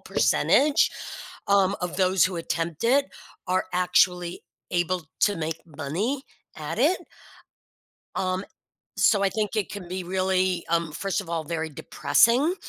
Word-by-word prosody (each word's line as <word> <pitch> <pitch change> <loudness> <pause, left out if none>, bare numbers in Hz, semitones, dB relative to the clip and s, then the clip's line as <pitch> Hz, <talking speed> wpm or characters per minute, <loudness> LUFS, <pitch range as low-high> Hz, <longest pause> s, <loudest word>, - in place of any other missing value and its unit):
percentage, 290 +1 +3 0.6
um, 200 0 +3
of 180 0 -3
those 185 0 +3
who 185 -1 -1
attempt 165 -1 -3
it 275 +4 +3 0.4
are 185 +1 0
actually 180 -1 +2 0.3
able 175 -1 0 0.2
to 205 -1 +3
make 160 0 -3
money 170 - -3 0.3
at - - -5
it. 370 - +3 1.2
Um, 185 +1 -1 0.5
so 205 -4 +4
I - - +4
think 215 +1 -2
it 210 - -1
can 200 -4 -7
be 185 0 -4
really 185 -1 0
um, 165 -2 0
first 195 +4 -2
of 185 - -10
all, 165 -1 -1
very 160 0 -3
depressing, 235 - +2
185 Hz, 135 wpm, -25 LUFS, 170-200 Hz, 1.2 s, so